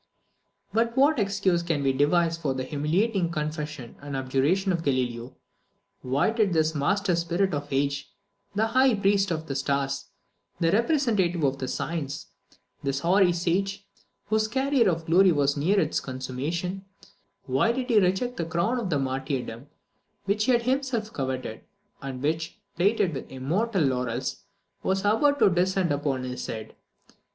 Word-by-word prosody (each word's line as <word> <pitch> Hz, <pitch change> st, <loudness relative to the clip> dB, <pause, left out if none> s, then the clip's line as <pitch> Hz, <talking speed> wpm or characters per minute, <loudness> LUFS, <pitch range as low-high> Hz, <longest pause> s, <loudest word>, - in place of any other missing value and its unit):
But 230 Hz, +2 st, +1 dB
what 285 Hz, +1 st, +4 dB
excuse 195 Hz, -3 st, +1 dB
can 165 Hz, -4 st, -1 dB
we 135 Hz, -1 st, +2 dB
devise 165 Hz, +5 st, +2 dB
for 150 Hz, -5 st, -2 dB
the 130 Hz, -, -2 dB
humiliating 170 Hz, -, 0 dB
confession 150 Hz, -5 st, -4 dB
and 140 Hz, -1 st, -5 dB
abjuration 140 Hz, +9 st, +1 dB
of 170 Hz, -2 st, 0 dB
Galileo? 125 Hz, -4 st, -1 dB, 0.7 s
Why 135 Hz, +10 st, +1 dB
did 215 Hz, -5 st, +1 dB
this 160 Hz, -1 st, +2 dB
master 180 Hz, +6 st, +1 dB
spirit 170 Hz, +3 st, 0 dB
of 145 Hz, 0 st, -3 dB
the 135 Hz, -, -2 dB
age 140 Hz, 0 st, -1 dB, 0.4 s
this 220 Hz, +2 st, +1 dB
high 260 Hz, 0 st, +4 dB
priest 200 Hz, -1 st, +2 dB
of 160 Hz, -2 st, -2 dB
the 140 Hz, -, -4 dB
stars 140 Hz, 0 st, -1 dB, 0.5 s
this 165 Hz, 0 st, +2 dB
representative 215 Hz, -, +2 dB
of 135 Hz, -2 st, 0 dB
science 145 Hz, -3 st, -4 dB, 0.5 s
this 140 Hz, 0 st, -2 dB
hoary 185 Hz, +2 st, +4 dB
sage, 195 Hz, +3 st, -1 dB, 0.4 s
whose 215 Hz, 0 st, +1 dB
career 265 Hz, -1 st, +2 dB
of 165 Hz, -2 st, -2 dB
glory 180 Hz, +3 st, +5 dB
was 145 Hz, -2 st, +2 dB
near 180 Hz, +8 st, +2 dB
its 160 Hz, -4 st, +1 dB
consummation 145 Hz, +9 st, -4 dB, 0.6 s
why 135 Hz, -, +2 dB
did 250 Hz, +1 st, -2 dB
he 220 Hz, -, +6 dB
reject 195 Hz, +7 st, 0 dB
the 170 Hz, -, -1 dB
crown 170 Hz, +10 st, 0 dB
of 180 Hz, -, -1 dB
martyrdom 130 Hz, -2 st, -3 dB, 0.6 s
which 205 Hz, +2 st, +1 dB
he 255 Hz, -, +3 dB
had 240 Hz, -1 st, +3 dB
himself 255 Hz, -4 st, -1 dB
coveted, 130 Hz, -4 st, -4 dB, 0.4 s
and 135 Hz, -2 st, -6 dB
which, 160 Hz, +2 st, -2 dB, 0.2 s
plaited 185 Hz, 0 st, +2 dB
with 135 Hz, -, -7 dB
immortal 175 Hz, -, 0 dB
laurels, 125 Hz, -1 st, -2 dB, 0.4 s
was 190 Hz, 0 st, 0 dB
about 225 Hz, +9 st, +3 dB
to -, -, +5 dB
descend 185 Hz, -1 st, +1 dB
upon 140 Hz, -2 st, -1 dB
his 125 Hz, 0 st, -5 dB
head? 110 Hz, -1 st, -6 dB
170 Hz, 150 wpm, -26 LUFS, 140-200 Hz, 0.7 s, he